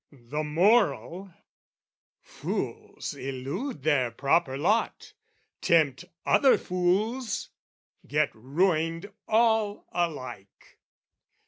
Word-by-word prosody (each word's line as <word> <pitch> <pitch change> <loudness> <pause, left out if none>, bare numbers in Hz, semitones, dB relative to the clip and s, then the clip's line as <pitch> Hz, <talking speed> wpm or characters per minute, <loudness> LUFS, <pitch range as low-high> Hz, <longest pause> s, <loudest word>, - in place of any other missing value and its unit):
"The 145 +3 -5
moral, 190 +2 +2 0.9
fools - - -5
elude 135 - -5
their 140 -5 +2
proper 135 +3 +1
lot, 205 +10 0 0.5
"Tempt 160 -2 +2 0.2
other 270 - +5
fools, 205 +8 -1 0.6
get 150 0 +1
ruined 165 - 0 0.2
all 220 -2 +2
alike. 135 - -5
165 Hz, 75 wpm, -27 LUFS, 140-205 Hz, 0.9 s, other